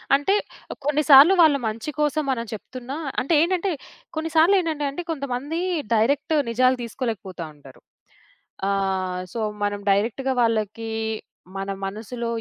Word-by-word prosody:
అంటే, 335 +9 +2 0.5
కొన్ని 300 +1 +2
సార్లు 285 +7 +10
వాళ్ళ 310 -3 +6
మంచి 225 +7 -4
కోసం 300 +1 +1
మనం 235 -2 -2
చెప్తున్నా 255 +6 -7 0.2
అంటే 280 +6 0
ఏంటంటే, 370 +2 +1 0.5
కొన్ని 320 0 -2
సార్లేంటంటే 325 -4 +3
అండి, 345 +6 -5
కొంతమందీ 280 +3 -3 0.3
డైరెక్ట్ 280 +8 +2
నిజాలు 255 +2 +3
తీసుకోలేకపోతాంటరు. 185 - -6 0.9
ఆహ్, 190 -2 -1
సో, 230 - -3 0.3
మనం 205 0 -2
డైరెక్ట్‌గా 240 +6 0
వాళ్ళకీ 225 0 -1 0.7
మన 195 0 -3
మనసులో 230 +4 -5
255 Hz, 115 wpm, -23 LUFS, 215-300 Hz, 0.9 s, సార్లు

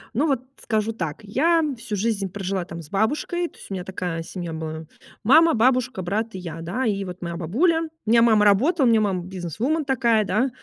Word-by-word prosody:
Ну 290 +6 +2
вот 270 -5 +1 0.2
скажу 220 0 -1
так, 165 -9 -4
я 320 +11 +2
всю 230 -3 -5
жизнь 200 -2 -1
прожила 190 -2 -3
там 170 -1 -8
с 150 - -14
бабушкой, 295 - 0
то - - -20
есть - - -12
у - - -2
меня 185 - -4
такая 180 -3 -4
семья 170 0 -6
была 160 0 -5 0.4
мама, 315 +8 +6
бабушка, 250 -3 +2
брат 215 +4 -2
и - - -5
я, 165 -2 -7
да, 195 +11 -2
и 200 -3 0
вот 180 -1 -8
моя 170 -1 -4
бабуля 270 - +1 0.2
у - - -3
меня 230 +1 +6
мама 220 -3 +5
работала, 265 - +4
у - - +5
меня 225 -1 +4
мама 190 -4 0
бизнесвумен 190 - -2
такая, 235 -5 +2
да, 215 +7 +1
210 Hz, 215 wpm, -23 LUFS, 180-255 Hz, 0.4 s, мама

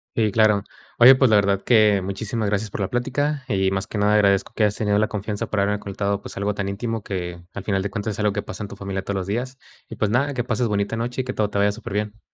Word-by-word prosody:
Si, 110 -2 +2
claro. 105 -2 +4 0.3
Oye, 125 +3 +9
pues, 130 -1 +4
la 105 - +5
verdad 100 -1 +2
que 105 -4 +4
muchísimas 105 +3 -2
gracias 105 +1 -1
por 100 - -5
la 95 - -1
plática 135 +3 -1
y, 95 -3 +1
más 95 0 -2
que - - -5
nada, 105 +1 +3
agradezco 100 -2 +3
que 110 - 0
hayas 105 0 +2
tenido 105 -1 +1
la 110 - +2
confianza 105 +1 -4
para 100 -2 +1
haberme 105 +1 0
contado, 100 0 -2
pues, - - -9
algo 100 +1 -1
tan 100 -1 -3
íntimo 115 +3 -3
que, 90 -3 -5
al 100 - -6
final 100 -1 0
de 100 - -3
cuentas, 105 +1 -3
es - - -10
algo 105 -1 +1
que - - -2
pasa 95 - -8
en - - -8
tu - - -10
familia 95 -1 -4
todos 100 - -3
los 95 -1 -3
días. 125 +6 -3 0.3
Y, 115 - -8
pues, 105 -1 0
nada, 140 +5 +1
que 120 -2 -1
pases 120 -1 0
bonita 105 +1 -1
noche 120 +3 -2
y - - -5
que 125 - -4
todo 105 -4 -1
te - - -4
vaya 100 +1 +3
superbién. 105 0 -4
105 Hz, 275 wpm, -23 LUFS, 100-115 Hz, 0.3 s, Oye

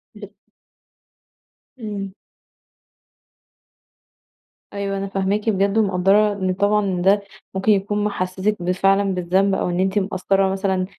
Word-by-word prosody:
ل - - -9 1.5
إمم. 205 -4 -5 2.6
أيوه، 200 -1 -3
أنا 195 0 -3
فاهماكِ 195 +3 -1
بجد، 200 +1 +1
ومقدرة 200 +1 +3
إن 185 -2 -1
طبعًا 200 -2 +1
ده 200 +3 +3 0.3
ممكن 190 +3 +2
يكون 205 +1 0
مِحسسك 195 +1 -1
بفعلًا 195 +3 +2
بالذنب، 185 +2 +1
أو - - -1
إن 175 0 -2
أنتِ 190 +2 +1
مِقصرة 195 0 0
مثلًا 190 -1 -1
195 Hz, 110 wpm, -21 LUFS, 190-205 Hz, 2.6 s, ومقدرة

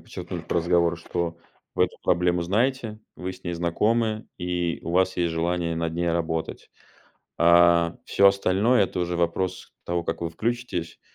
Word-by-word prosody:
подчеркнули - - -7
по - - -3
разговору, 85 0 +2
что 85 0 -4 0.4
вы - - +4
эту - - -7
проблему 90 0 +2
знаете, 110 +4 0 0.2
вы 95 +1 -4
с 90 - -15
ней 85 - -2
знакомы, 110 +6 0
и 90 -1 -2
у 85 - -5
вас 95 +1 +2
есть 85 -2 0
желание 85 0 -1
над 85 0 -2
ней 85 0 0
работать. 80 -1 -3 0.7
А 85 0 +5
всё 100 - +5
остальное- 100 +3 +3
это 90 - -4
уже 90 0 -1
вопрос 90 +2 -2
того, 85 0 -2
как 80 0 -3
вы 85 - -1
включитесь. 110 -3 -3
85 Hz, 160 wpm, -25 LUFS, 85-95 Hz, 0.7 s, А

